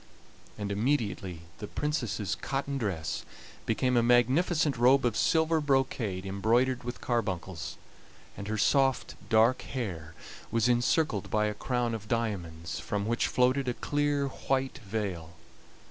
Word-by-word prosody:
And 100 -1 -3
immediately 100 - -1 0.2
the 105 - -5
Princess's 125 - -2
cotton 140 0 -3
dress 90 -9 -2 0.4
became 125 +3 +1
a 120 - +5
magnificent 135 +6 +3
robe 125 +3 +4
of 120 -3 +1
silver 160 +3 +2
brocade 130 -9 0
embroidered 115 +6 +1
with 120 +1 -6
carbuncles, 95 -8 -2 0.6
and 100 - -7
her 110 0 -1
soft 135 +4 +2 0.2
dark 115 +3 +4
hair 85 - -5 0.3
was 115 +1 +2
encircled 120 - +1
by 105 0 +2
a 105 - 0
crown 120 +2 -1
of 110 -2 -5
diamonds, 95 -8 -3
from 105 -1 -2
which 115 +2 +1
floated 130 +2 +2
a 125 - 0
clear 145 -1 0
white 135 0 -2
veil. 95 -6 -4
120 Hz, 130 wpm, -29 LUFS, 100-135 Hz, 0.6 s, a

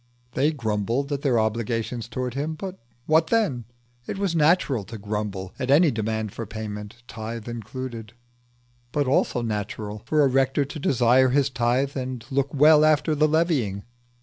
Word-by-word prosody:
They 140 +6 +2
grumbled 115 +1 -2
at 140 -1 -2
their 130 -5 +2
obligations 115 +1 -2
towards 125 +1 -4
him; 150 +3 -2
but 190 +3 -7 0.3
what 160 +1 +3
then? 165 - +1 0.4
It - - -4
was 195 -4 -1
natural 150 - +3
to 115 +3 -8
grumble 105 -2 -4
at 130 - -3
any 150 +3 +5
demand 110 -2 -2
for 115 - -6
payment, 105 +1 -7
tithe 115 0 -6
included, 120 0 -6 0.8
but 145 -1 0
also 130 -2 +1
natural 105 -1 -4
for 155 -1 +3
a - - +5
rector 135 +2 +2
to 150 +3 -7
desire 130 -1 +4
his 140 +1 +2
tithe 125 +3 0
and 130 -3 -4
look 140 +1 0
well 150 +2 +6
after 155 +1 +3
the 155 +1 +3
levying. 150 - 0
125 Hz, 160 wpm, -24 LUFS, 110-145 Hz, 0.8 s, well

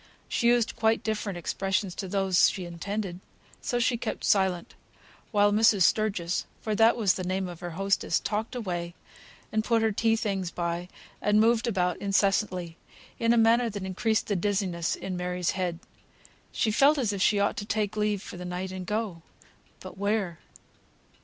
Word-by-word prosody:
She 235 - 0
used 240 -1 +3
quite 225 0 +1
different 210 -4 -2
expressions 195 +2 -1
to 195 - -5
those 190 -1 +3
she 185 - -5
intended. 180 +2 -4 0.4
So 245 - -1
she 240 0 +1
kept 230 - -4
silent, 190 -3 +1 0.6
while 205 -2 +3
Mrs. 210 -2 +4
Sturgis 190 -4 +1
(for 215 - -2
that 225 +3 +4
was 205 -6 +3
the 185 - -4
name 185 +1 -1
of 175 -2 -8
her 175 -2 -7
hostess) 195 -3 +1
talked 220 +4 -3
away, 175 -7 -4 0.6
and 220 0 +1
put 230 -1 +2
her 220 - +2
tea 225 +2 +2
things 195 -5 -2
by, 170 0 -3 0.3
and 210 0 +3
moved 230 +1 +3
about 180 -5 0
incessantly, 195 -4 0 0.4
in 230 0 +3
a 235 - +4
manner 230 +1 +4
that 205 -2 -6
increased 215 +4 0
the 205 - -1
dizziness 185 -3 -1
in 190 -1 -5
Mary's 180 -1 -1
head. 180 -3 -2 0.7
She 220 - 0
felt 280 +7 +5
as 230 -7 0
if 195 - -3
she 205 +1 +3
ought 200 - +1
to 205 - -4
take 210 -1 -1
leave 210 -2 0
for - - -9
the 180 - -7
night 180 +1 -4
and 185 -1 -6
go. 210 -5 -2 0.6
But 185 0 -10
where? 200 -4 -1
200 Hz, 175 wpm, -27 LUFS, 180-220 Hz, 0.7 s, felt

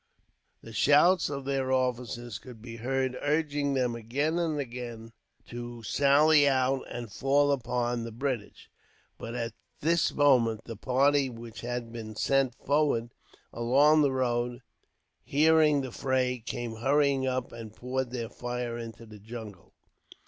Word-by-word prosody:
The 115 - -10
shouts 150 - +4
of 140 -2 -5
their 135 -1 -1
officers 125 -2 -1
could 125 -3 -12
be 115 +1 -9
heard, 130 +2 -1
urging 145 -2 0
them 125 -2 +1
again 125 -2 -3 0.3
to 120 -1 -8
sally 145 +4 +5
out 130 0 +1
and 120 -3 -6
fall 145 +1 +2
upon 120 -2 -1
the 115 - -6
British; 120 -2 -4 0.5
but 115 +1 -6
at 115 -1 -3 0.3
this 165 +2 +2
moment, 120 -6 +3
the 115 - -7
party 135 +4 +2
which 115 -1 -9
had 120 -1 -4
been 110 -2 -7
sent 135 +1 +1
forward 140 -5 0 0.4
along 140 +6 +4
the 140 -2 +3
road, 120 -1 -1 0.6
hearing 155 0 +4
the 130 -2 -6
fray, 130 0 0
came 115 0 -5
hurrying 135 +2 +2
up 130 -1 -2
and 115 -2 -9
poured 130 0 -3
their 120 -2 -4
fire 120 -1 -4
into 115 0 -8
the 105 -1 -13
jungle. 110 -3 -10
125 Hz, 135 wpm, -29 LUFS, 115-140 Hz, 0.6 s, sally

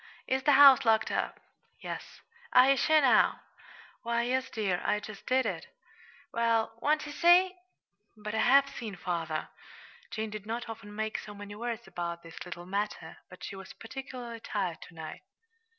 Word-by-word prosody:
"Is 265 0 0
the 290 +2 +4
house 275 -1 +9
locked 220 -2 +3
up?" - - -2 0.4
"Yes." - - -8 0.3
"Are 255 +2 +7
ye - - +5
sure, 310 +4 +4
now?" 265 -3 +4 0.6
"Why, 235 0 0
yes, 260 +2 -1
dear; 195 -5 -1
I 210 - +1
just 210 -1 -10
did 260 +1 +2
it." - - -3 0.7
"Well, 230 -1 +1
won't 300 +1 +2
ye 295 - -7
see?" 350 +3 +5 0.6
"But 210 0 -6
I 220 - 0
have 275 +4 +5
seen, 235 -7 -7
father." 165 -4 -3 0.6
Jane 220 -1 -4
did 210 -1 -7
not 235 +2 -3
often 220 -2 -9
make 220 0 -2
so 210 - -10
many 205 0 -9
words 235 +2 -4
about 170 -2 -5
this 165 -1 -9
little 175 0 -7
matter, 200 -4 -3
but 180 - -13
she - - -6
was 195 0 -10
particularly 240 -1 -8
tired 190 -7 -3
to 175 - -18
night. 160 -1 -8
225 Hz, 170 wpm, -30 LUFS, 200-260 Hz, 0.7 s, house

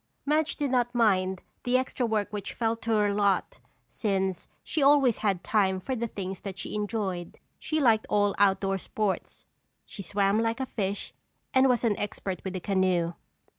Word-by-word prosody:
Madge 305 +2 +1
did 285 -3 -1
not 245 -1 +1
mind 190 -5 +2 0.2
the 250 +1 +3
extra 255 -1 -1
work 215 -2 -1
which 205 -2 -4
fell 225 -1 0
to 230 0 -8
her 210 -2 +3
lot 200 -1 +1 0.3
since 190 -4 -1 0.2
she 315 - -2
always 275 -4 +5
had 195 -4 0
time 190 -3 +2
for 260 +8 -3
the 235 0 -2
things 190 -3 -6
she 190 - -7
enjoyed. 205 -4 -3 0.2
She 310 - -1
liked 225 -6 +3
all 205 -1 +2
outdoor 195 -1 +3
sports. 205 0 -3 0.4
She 200 - -8
swam 200 +2 +1
like 230 +2 0
a 265 - -1
fish 200 -5 -3 0.4
and 260 0 +5
was 250 -1 +2
an 220 -3 +2
expert 200 -2 -4
with 190 -1 -4
a - - -2
canoe. 185 -3 +1
210 Hz, 170 wpm, -28 LUFS, 190-235 Hz, 0.4 s, always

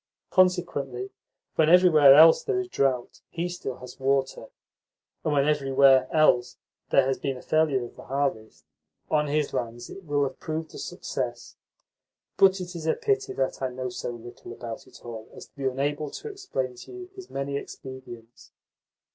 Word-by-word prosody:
Consequently, 145 -9 +1 0.5
when 160 -1 +4
everywhere 160 -6 +7
else 160 +2 +8
there 405 -3 0
is 375 - -3
drought, 135 - -1
he 170 +1 -3
still 175 -7 -5
has 125 +2 -12
water, 135 0 0 0.8
and 155 - 0
when 140 -1 +2
everywhere 135 -3 +4
else 155 -7 +3 0.3
there 135 - +4
has 135 0 -1
been 135 -2 -2
a - - -10
failure 150 -5 +1
of - - -13
the - - -11
harvest, 135 -5 -3 0.5
on 150 -1 +2
his 150 0 0
lands 120 0 -4
it 195 - -10
will 145 -3 0
have 135 - -4
proved 160 0 -5
a - - -8
success. 125 -9 -5 0.8
But 195 0 +5
it 180 0 -7
is 160 -1 -5
a - - +2
pity 415 -3 -1
that 135 0 -2
I 130 - +1
know 125 0 -4
so 120 - -5
little 120 0 -10
about 115 -1 -8
it - - -16
all 115 -2 -8
as - - -10
to - - -30
be 140 -2 -5
unable 145 +3 -1
to 445 - -7
explain 385 - -4
to - - -11
you 370 0 -9
his 380 -2 -11
many 140 0 -3
expedients. 130 -4 -10
140 Hz, 175 wpm, -26 LUFS, 130-165 Hz, 0.8 s, else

